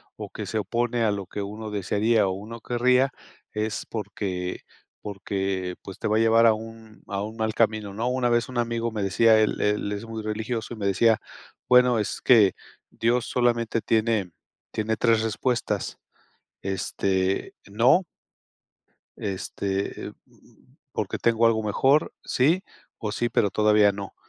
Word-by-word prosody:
o - - -7
que - - -6
se 110 - -2
opone 120 +4 -1
a 110 - +3
lo 100 -1 -3
que 100 - -6
uno 105 +2 -6
desearía 105 +2 +2
o - - 0
uno 110 +5 -7
querría, 125 +3 +2 0.4
es 110 0 -3
porque 95 -4 -4 0.4
porque 95 -2 -3
pues, 95 - -9
te - - -2
va 110 +1 +2
a - - +3
llevar 115 +1 +5
a 115 - +7
un 110 0 -10
a 100 -1 -3
un 110 +2 -5
mal 110 -1 -1
camino, 110 -3 0
¿no? 115 +4 -2
Una 125 -1 +1
vez 120 0 +2
un 130 - -7
amigo 115 0 -1
me 105 -2 -3
decía, 110 +3 +4
él 110 - +1
él 105 0 0
es 105 +2 -4
muy 115 -1 -6
religioso, 110 +2 -3
y - - -8
me 100 - -4
decía: 105 +3 +3 0.5
"Bueno, 125 -2 +5
es 105 - -3
que 110 -6 +6 0.4
Dios 120 +1 +1
solamente 120 -2 +1
tiene 110 -5 +1 0.4
tiene 110 +1 -1
3, 115 -1 +3
respuestas, 120 +3 -1 0.6
este, 95 0 -1 0.2
no" 120 - +4 1.1
"este, 100 0 -3
mm, - - -25 0.2
porque - - -3
tengo 115 0 +3
algo 110 -1 +2
mejor, 135 +8 +2
sí, 160 +9 +2 0.4
o 105 -3 -3
sí, 120 +2 0
pero 100 - +1
todavía 105 -1 +4
no", 100 0 -7
110 Hz, 160 wpm, -25 LUFS, 100-115 Hz, 1.1 s, a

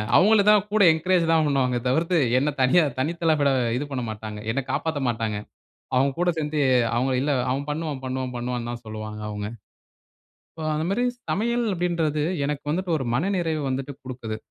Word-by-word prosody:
அவங்களும்தான் 210 0 +5
கூட 215 0 +3
என்கரேஜ் 175 +2 +2
தான் 160 -1 +4
பண்ணுவாங்க 130 -3 +1
தவிர்த்து, 165 +7 +2 0.2
என்ன 145 +3 +1
தனியா 135 +7 +5 0.2
தனித்தல 165 +2 +1
விட 140 -1 +3 0.3
இது 145 - -2
பண்ணமாட்டாங்க. 110 -4 -5
என்ன 135 +4 -1
காப்பாத்தமாட்டாங்க. 120 -9 -1 0.6
அவங்க 135 +2 +3
கூட 175 0 +2
சேர்ந்துட்டு 150 -1 -1 0.3
அவங்க, 130 +3 +1
இல்ல 145 +2 0 0.2
அவன் 140 +3 -2
பண்ணுவான், 150 -2 -3
பண்ணுவான், 130 -1 -3
பண்ணுவான்னு 120 -1 -3
தான் 120 0 -7
சொல்லுவாங்க 110 0 -6
அவங்க. 105 -1 -4 1.1
அப்ப 160 -1 -4
அந்த 155 - -1
மாதிரி 235 +5 +1 0.3
சமையல் 235 +3 0
அப்படின்றது 170 -4 0 0.2
எனக்கு 145 0 -3
வந்துட்டு 180 +3 -2
ஒரு 135 - -3
மனநிறைவ 170 +1 0
வந்துட்டு 135 +2 -3
குடுக்குது. 120 -4 -5
145 Hz, 155 wpm, -24 LUFS, 125-170 Hz, 1.1 s, அவங்களும்தான்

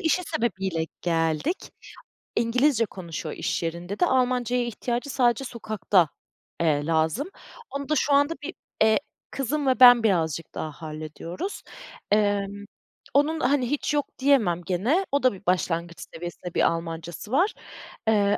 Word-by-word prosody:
işi 360 +1 +2
sebebiyle 190 - -1 0.2
geldik. 165 - 0 0.7
İngilizce 235 +1 +3
konuşuyor 170 -6 -6
iş - - -2
yerinde 170 +4 -4
de. - - +5
Almanca'ya 250 -3 +1
ihtiyacı 240 +3 -3
sadece 245 -1 +2
sokakta, 215 - +1 0.5
eee, 150 -3 +2
lazım. 160 - +1 0.4
Onu 280 0 -5
da - - +3
şu 285 +1 +2
anda 285 +3 +4
bir, - - -5 0.3
eee, 220 0 +4 0.3
kızım 275 +2 -1
ve 255 - +2
ben 245 -2 +9
birazcık 165 -6 0
daha 155 - -4
hallediyoruz. 155 - -6 0.5
Emm, 205 -1 +1 0.5
onun, 305 +3 +3
hani, 255 -2 +1
hiç 295 +1 -1
yok 290 -2 +1
diyemem 240 -11 +3
gene. 235 - +1
O 280 -1 +1
da 255 - +4
bir 195 0 -13
başlangıç 170 -1 0
seviyesinde 175 +1 -7
bir - - +1
Almanca'sı 165 +4 -6
var, 360 +10 +3 0.5
eee, 205 -2 +3
215 Hz, 135 wpm, -25 LUFS, 170-265 Hz, 0.7 s, ben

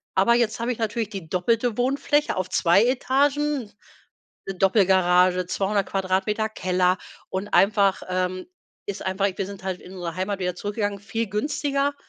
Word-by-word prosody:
aber 195 +5 +4
jetzt 230 -2 +1
habe 235 +2 -1
ich - - -12
natürlich 225 -1 -2
die 190 -6 -8
doppelte 230 +6 0
Wohnfläche 275 +4 +1
auf 185 0 -2
2 180 +3 +4
Etagen, 275 -1 +1 0.8
'ne 195 - -4
Doppelgarage, 185 -2 +3
200 195 +2 0
Quadratmeter 195 +3 0
Keller 185 -2 +1 0.3
und 190 +2 -3
einfach, 200 -1 +3
ähm, 185 0 -2 0.4
ist 200 -1 -5
einfach 190 +1 +1
wir 195 - -2
sind 200 -1 -9
halt 185 -2 -3
in 180 - -12
unsere 175 -2 -5
Heimat 190 +1 -2
wieder 180 -1 -2
zurückgegangen, 205 0 -3
viel 225 +2 -3
günstiger. 280 +6 -1
200 Hz, 155 wpm, -24 LUFS, 185-230 Hz, 0.8 s, aber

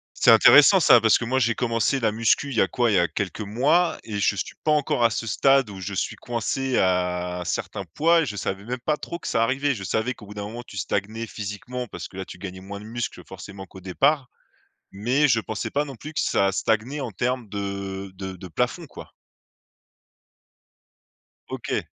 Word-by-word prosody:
C'est - - +5
intéressant - - +8
ça, - - +7
parce - - +5
que - - -4
moi, 130 +3 0
j'ai 115 -2 +2
commencé 115 +2 0
la 110 -3 +1
musculation, 115 +5 +2
il 125 - -5
y - - +4
a 95 - +3
quoi, 120 -2 +1
il - - +1
y - - +5
a 85 - +3
quelques 100 0 -4
mois, 140 - +2
et 105 -2 -4
je 100 - +2
suis - - -4
pas 155 - +2
encore 145 -5 +1
à 115 - +5
ce 115 +2 -3
stade 135 +1 +3
où 95 - -9
je 95 +2 -5
suis - - -2
coincé 125 +2 -2
à, 90 -1 0
un - - -5
certain 100 +3 -3
poids, 165 +2 +4
et 145 - -2
je 105 - -5
savais 95 +1 -3
même 125 +2 -4
pas 150 - +1
trop 170 - -6
que - - -6
ça 115 -1 +1
arrivait. 135 +4 +1
Je 100 -5 -7
savais 110 +6 -1
qu'au 105 - -14
bout 105 - -10
d'un 105 - -5
moment, 115 +4 -7
tu 100 - -13
stagnais 105 +5 -2
physiquement, 110 +5 -6
parce - - -7
que - - -15
là, 95 - -3
tu - - -10
gagnais 95 -1 -7
moins 100 +1 -8
de 105 - -11
muscle, 120 +1 -5
forcément 95 +1 -10
qu'au 95 - -13
départ, 135 - +1 0.7
mais 125 +9 +2
je 115 -4 +3
pensais 110 -2 -4
pas 145 +1 0
non 135 -3 -8
plus 155 +7 -9
que - - -2
ça 100 0 +2
stagnait 115 +8 0
en 130 -5 -4
termes 125 +3 -2
de 100 -1 -5
de 95 0 -6
de 90 +1 -10
plafond, 80 - -2
quoi. - - -12 2.4
OK. - - -3
110 Hz, 220 wpm, -24 LUFS, 95-125 Hz, 2.4 s, intéressant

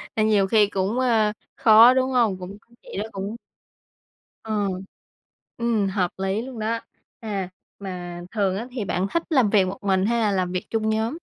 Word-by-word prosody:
Nên 215 -1 +2
nhiều 200 -2 +3
khi 210 0 +4
cũng, 200 +5 -1
a, 220 -4 +2 0.2
khó, 225 +3 +7
đúng 260 0 +1
hông? 230 -7 +2
Cũng 190 +3 -8
cái 235 - -27
chị - - -9
đó 205 - -1
cũng 200 +3 -5 1.1
ờ. 210 -2 -1 0.9
Ừm, 230 -4 +1
hợp 190 -2 0
lý 195 +3 -1
luôn 250 -2 -8
đó. 225 +2 -1 0.4
À, 200 -5 -4 0.3
mà 175 -3 -6
thường 195 -3 0
á 235 +4 -5
thì 235 -5 -4
bạn 185 +2 -1
thích 335 - +1
làm 260 -9 +3
việc 200 -3 +4
một 190 +2 -4
mình 190 -1 +2
hay 235 +1 +1
là 210 -2 +2
làm 185 -2 0
việc 185 0 -3
chung 220 -1 0
nhóm? 220 +7 -1
210 Hz, 190 wpm, -23 LUFS, 195-230 Hz, 1.1 s, khó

